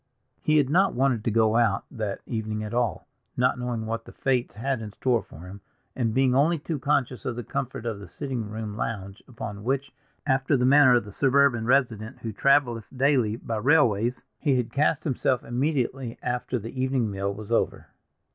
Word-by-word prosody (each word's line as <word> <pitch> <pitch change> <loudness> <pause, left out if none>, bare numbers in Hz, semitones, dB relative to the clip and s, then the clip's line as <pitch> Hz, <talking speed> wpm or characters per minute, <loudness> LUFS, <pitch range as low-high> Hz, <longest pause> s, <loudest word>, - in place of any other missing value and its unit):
He 155 0 +3
had 145 -3 +4
not 185 +7 +3
wanted 125 -4 +1
to - - +2
go 110 0 +3
out 115 -5 +2
that 110 -6 -4
evening 110 -2 -3
at 105 +1 -6
all, 120 -1 -1 0.3
not 125 0 +2
knowing 120 -3 -3
what 115 +1 -3
the - - -11
fates 130 -5 -1
had 130 +2 -2
in 105 -1 -6
store 120 -2 +1
for 80 - -14
him, 95 +2 -10 0.3
and 115 -3 0
being 130 -1 +3
only 155 +6 +3
too 150 0 -4
conscious 130 -3 0
of 125 -4 -3
the 120 - -5
comfort 120 +1 -4
of 110 -3 -3
the 100 - -10
sitting 130 -7 -4
room 110 -1 -5
lounge, 100 -3 -4
upon 110 -4 -7
which, 135 +3 -1 0.3
after 135 0 +2
the 125 - +1
manner 135 -1 +7
of 120 -4 +1
the 105 - -9
suburban 135 -1 +3
resident 120 -5 +1
who 115 - -3
traveleth 120 -3 +2
daily 130 -5 +3
by 115 -1 -4
railways, 120 -3 +2 0.2
he 140 -4 +2
had 125 -2 -2
cast 150 +1 +2
himself 130 -3 0
immediately 130 -1 -1
after 125 +1 -2
the 115 +4 -5
evening 130 -4 0
meal 100 0 -2
was 105 +2 -8
over. 115 - 0
120 Hz, 195 wpm, -26 LUFS, 110-135 Hz, 0.3 s, manner